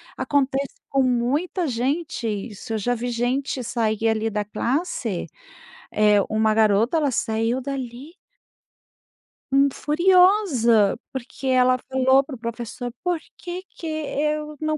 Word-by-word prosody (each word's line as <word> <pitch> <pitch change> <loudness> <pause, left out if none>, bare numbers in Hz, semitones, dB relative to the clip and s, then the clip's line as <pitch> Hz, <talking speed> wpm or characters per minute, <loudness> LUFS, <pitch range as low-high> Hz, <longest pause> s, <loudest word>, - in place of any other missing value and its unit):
Acontece 275 -1 0
com 275 -1 +2
muita 275 +9 0
gente 260 +1 -2
isso, 215 +2 -5
eu - - 0
já 245 +4 0
vi 245 +1 -3
gente 250 +3 -1
sair 225 -2 0
ali 220 0 +1
da 210 -1 -2
classe, 235 - -2 0.6
eh, 210 -1 +4
uma 220 0 +2
garota, 220 +6 +3
ela 295 -3 +2
saiu 230 +1 0
dali 265 +1 -6 1.4
hum, 275 +1 +4
furiosa, 315 - +3 0.2
porque 265 +1 -6
ela 255 -1 +4
falou 265 0 +4
para 275 -1 -8
o - - -11
professor: 235 +1 -5
"Por 355 -1 0 0.2
que 360 +1 -6
que 330 - -9
eu 300 0 -2
não 310 0 -1
255 Hz, 130 wpm, -23 LUFS, 225-295 Hz, 1.4 s, eh